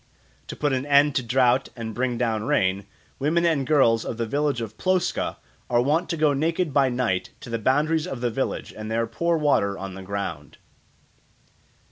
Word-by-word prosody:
To - - -6
put 145 -2 0
an 130 0 0
end 145 0 +5
to - - +1
drought 125 +1 +2
and 115 -2 -5
bring 125 +1 -1
down 115 -3 0
rain, 95 0 +1 0.3
women 165 +5 +1
and 155 -6 +1
girls 115 -7 +4
of 115 - -5
the 115 - -1
village 145 +2 0
of 110 -2 -6
Ploska 185 -1 0 0.3
are 120 - +3
wont 150 +8 +1
to 165 - -2
go 150 -2 +3
naked 160 +2 0
by 135 -1 +4
night 120 -7 -1
to 115 - -9
the 115 - -1
boundaries 150 +7 +1
of 135 - -5
the 120 -1 -1
village 130 +4 -3
and 110 0 -6
there 115 +1 0
pour 170 +9 0
water 105 -10 +1
on 95 0 -6
the 95 - -8
ground. 95 -6 -5
130 Hz, 190 wpm, -24 LUFS, 110-150 Hz, 0.3 s, end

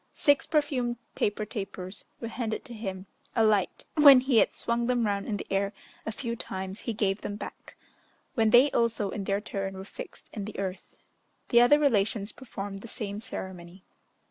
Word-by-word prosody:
Six 285 -2 +3
perfumed 275 -6 +1 0.2
paper 210 +1 0
tapers 195 -3 -6
were 230 - -4
handed 225 0 -3
to 245 - -9
him 190 -4 -5 0.3
a 225 - +4
light; 210 -3 +2
when 285 -4 +9
he 255 -3 +4
had - - +4
swung 235 0 -1
them 245 -2 +2
round 200 -1 -1
in 210 -3 -1
the - - -6
air 195 +1 +1 0.3
a - - 0
few 235 0 -4
times 190 -1 -5
he 230 - -3
gave 200 -2 0
them 205 - -4
back, - - -9 0.6
when 225 -2 +3
they 250 +6 +7
also, 225 -4 +1
in 200 - -4
their 200 +1 0
turn, 195 -2 -4
were 190 - -7
fixed - - -10
in 205 -3 -4
the 215 - -7
earth. 190 -1 -5 0.5
The 235 - +7
other 245 +5 +7
relations 215 -7 +2
performed 200 -5 -7
the 235 - -10
same 210 -3 -5
ceremony. 185 -3 -7
215 Hz, 185 wpm, -28 LUFS, 195-240 Hz, 0.6 s, when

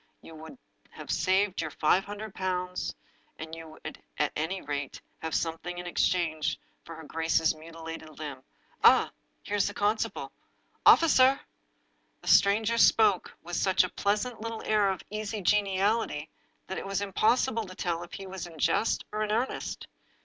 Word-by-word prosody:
You 165 - -12
would 160 - -11 0.3
have - - -8
saved 190 0 +2
your 160 - -3
five 175 +6 +2
hundred 205 0 -7
pounds, 180 -1 -2 0.4
and 160 +1 -8
you 160 -1 -9
would, - - -8 0.2
at 150 -1 +1
any 165 +5 -2
rate, 145 -3 -4 0.2
have 160 -1 -3
something 170 +2 -2
in 180 - -6
exchange 160 -3 0 0.3
for 165 - -9
her 160 - -10
grace's 160 +1 +1
mutilated 160 0 -9
limb. 145 -4 -6 0.4
Ah, - - +6 0.3
here 205 - -2
is 200 - +2
the - - -5
constable! 210 +2 -1 0.6
Officer!" 270 -4 +7 0.8
The - - -14
stranger 220 +3 +4
spoke 210 -6 +4
with 175 +1 -4
such 190 -1 +3
a - - -2
pleasant 210 +4 -1
little 230 0 -5
air 210 -2 +3
of 190 - -3
easy 215 0 -3
geniality 195 -4 +1 0.3
that 190 - -4
it - - -7
was 195 0 -1
impossible 225 +4 +1
to 185 - -10
tell 170 -2 -2
if 175 - -10
he 195 - -7
were 190 0 -7
in 160 - -14
jest 215 +8 +1
or 215 0 -2
in 210 -1 -1
earnest. 240 +5 -2
185 Hz, 165 wpm, -29 LUFS, 165-210 Hz, 0.8 s, Officer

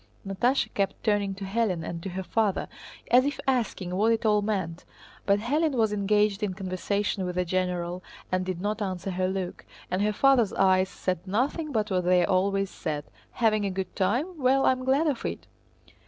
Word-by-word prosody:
Natásha 240 +8 +1
kept 195 -1 -1
turning 205 -3 +1
to 195 0 -6
Hélène 195 -4 -1
and 170 -1 -5
to 195 - -5
her 190 +1 -4
father, 210 0 0 0.4
as 250 +1 +7
if 285 +1 -2
asking 230 -8 -1
what 215 +4 +3
it 225 0 0
all 210 -1 +4
meant, 190 -5 -2 0.4
but 200 0 +5
Hélène 290 +7 0
was 220 -3 +2
engaged 205 0 +2
in 200 -3 -1
conversation 195 +1 -2
with 180 0 -3
a 180 - +1
general 180 0 -1 0.3
and 185 0 +1
did 185 -2 -3
not 210 +3 -2
answer 190 -1 -3
her 185 0 0
look, 185 -1 -4 0.3
and 185 - 0
her 210 +1 +2
father's 245 -2 +3
eyes 190 -1 +3
said 185 0 -3
nothing 280 - -1
but 215 -4 -1
what 180 -1 +1
they 180 -1 +4
always 195 +1 +1
said: 150 -3 -4 0.3
"Having 215 -3 +2
a - - 0
good 190 0 -4
time? 270 - 0
Well, 265 +1 +3
I'm 255 0 +2
glad 275 +5 +3
of 285 -6 -1
it!" - - -4
200 Hz, 190 wpm, -27 LUFS, 185-225 Hz, 0.4 s, as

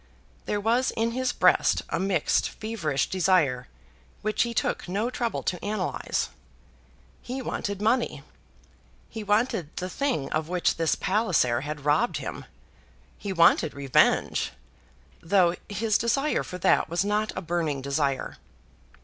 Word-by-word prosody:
There 205 - 0
was 235 +5 +2
in 225 +1 -1
his 255 +1 0
breast - - +3
a - - -1
mixed, 190 -5 +1
feverish 165 - -2
desire, 165 -9 +2 0.6
which 215 0 0
he 235 - +1
took 230 - -1
no 210 +6 -1
trouble 235 -2 -2
to 180 - -2
analyse. 210 +1 -2 0.9
He 255 +2 -5
wanted 200 -5 -3
money. 225 - +1 0.9
He 220 -1 -5
wanted 210 - +1
the 185 0 -3
thing 265 - -1
of 155 +1 -1
which 180 -1 +1
this 165 -1 +1
Palliser 180 - +1
had 150 0 -6
robbed 150 +12 +2
him. - - -6 0.7
He 200 - -4
wanted 170 -4 +4
revenge, 140 -2 +2 0.7
though 175 0 +3 0.2
his 210 +1 +1
desire 275 +6 +1
for 180 - -7
that 165 - +2
was 175 +4 0
not 210 +1 0
a - - -3
burning 165 -4 -1
desire. 140 0 -1
190 Hz, 135 wpm, -26 LUFS, 155-225 Hz, 0.9 s, wanted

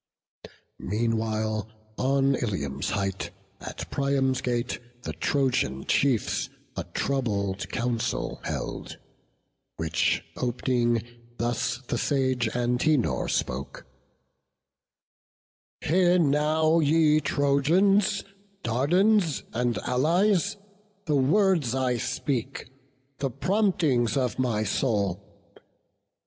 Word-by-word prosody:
Meanwhile, 110 0 -1 0.3
on 135 +2 +2
Ilium's 75 - -2
height, 100 -1 -2 0.3
at - - -7
Priam's 135 -2 +1
gate 120 0 -1 0.2
The - - -4
Trojan 125 - 0
chiefs 130 -7 +1 0.3
a - - -4
troubled 100 -8 -2
council 120 -1 -2
held; - - -5 0.8
Which 80 0 0
op'ning, 120 -2 0 0.3
thus 120 +1 -1
the 120 - -1
sage 130 -4 +1
Antenor 125 - +1
spoke: - - -3 2.0
"Hear 180 +2 +3
now, 155 +1 +3
ye 155 0 +4
Trojans, 175 +9 +2 0.4
Dardans, 170 - +2
and 120 0 0
Allies, 180 +9 +2 0.5
The 155 - 0
words 155 - +3
I 130 -2 +1
speak, 130 +1 -3 0.5
the 135 - 0
promptings 155 - +1
of 125 -3 -1
my 115 -4 +1
soul. 100 -4 -2
130 Hz, 85 wpm, -26 LUFS, 115-155 Hz, 2.0 s, ye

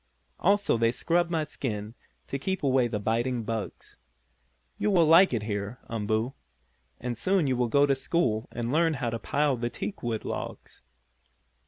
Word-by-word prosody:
Also 200 - +3
they 115 0 +3
scrub 170 +7 +1
my 165 -2 0
skin 110 -8 -4 0.3
to 140 - -4
keep 190 +5 -2
away 130 -3 +3
the 115 -2 -2
biting 115 +3 0
bugs. 110 -5 -5 0.8
You - - +1
will 175 -5 +5
like 165 +5 +7
it 115 -4 -1
here, 105 +2 -3
Umboo, 110 +3 -1 0.7
and 120 0 -3
soon 185 - +2
you 130 -2 +1
will 125 0 +1
go 140 +5 +4
to 140 - +3
school 130 -5 0
and 120 0 -3
learn 160 +1 +3
how 120 -4 -2
to 115 - -3
pile 145 0 +1
the 120 0 -2
teakwood 120 - -4
logs." - - -6
125 Hz, 165 wpm, -28 LUFS, 115-155 Hz, 0.8 s, like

